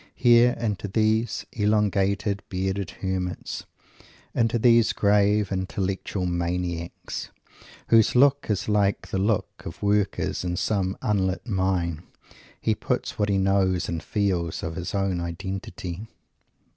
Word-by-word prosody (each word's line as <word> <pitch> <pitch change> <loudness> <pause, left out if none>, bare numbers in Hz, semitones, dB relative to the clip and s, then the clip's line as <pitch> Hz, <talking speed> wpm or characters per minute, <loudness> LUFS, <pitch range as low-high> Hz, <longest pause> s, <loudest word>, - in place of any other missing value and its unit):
Here, 120 0 +5
into 105 -3 -2
these 110 +3 +1
elongated, 100 -1 +1
bearded 95 0 -2 0.2
hermits, 90 -1 -3 0.7
into 115 0 +2
these 115 -1 +4
grave, 105 0 +3
intellectual 95 0 -2
maniacs, 85 -1 -3 0.6
whose 115 0 +5
look 140 +2 +4
is 105 -2 0
like 100 -1 +1
the 95 - 0
look 105 +1 -1
of 85 +4 -8
Workers 100 -2 0
in 90 -1 -2
some 95 -2 0
unlit 95 -3 0
Mine, 95 -6 0 0.6
he - - +1
puts - - -3
what 105 0 +1
he 100 - +2
knows 95 -2 +2
and 85 -2 -3
feels 90 -5 -1
of 80 - -3
his 90 +3 -4
own 95 -2 0
identity. 90 +2 -5
100 Hz, 120 wpm, -25 LUFS, 90-105 Hz, 0.7 s, Here